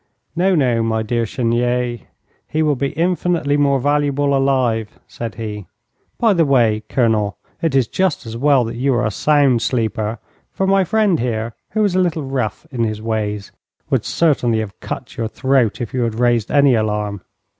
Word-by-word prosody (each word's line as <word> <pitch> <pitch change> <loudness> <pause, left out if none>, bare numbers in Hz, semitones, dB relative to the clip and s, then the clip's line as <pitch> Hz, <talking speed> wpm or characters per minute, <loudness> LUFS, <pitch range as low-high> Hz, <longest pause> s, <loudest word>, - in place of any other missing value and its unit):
'No, 185 +2 +2
no, 125 -7 +2
my 110 -1 0
dear 115 +1 -1
Chenier, 120 +1 0 0.5
he 155 +1 0
will 150 -2 +2
be 140 +2 -1
infinitely 170 -3 0
more 140 -2 +2
valuable 145 0 +1
alive,' 125 -5 0
said 115 -2 -6
he. 105 -3 -6 0.5
'By 225 -3 +4
the 170 -3 +3
way, 120 -7 +3
Colonel, 110 -5 +1 0.2
it 165 -5 0
is 130 -4 +3
just 185 -5 -1
as 115 0 -7
well 135 +1 +3
that 115 +1 -5
you 135 +1 +1
are 120 - +1
a 105 - 0
sound 140 -1 +3
sleeper, 110 -2 -1 0.3
for 190 - -1
my 195 0 +3
friend 200 -3 +2
here, 115 -1 -2 0.2
who 215 0 +2
is 200 -3 +1
a 185 - +2
little 170 -4 0
rough 130 -6 -3
in 120 -3 -1
his 110 -1 -2
ways, 105 -2 -3 0.4
would - - +2
certainly 130 -8 +1
have 110 -3 -5
cut - - -7
your 115 - -1
throat 130 -1 +1
if 120 - -5
you 130 - 0
had 115 -2 -1
raised 120 -2 +1
any 140 -2 +4
alarm. 105 -3 -1
125 Hz, 180 wpm, -19 LUFS, 110-145 Hz, 0.5 s, By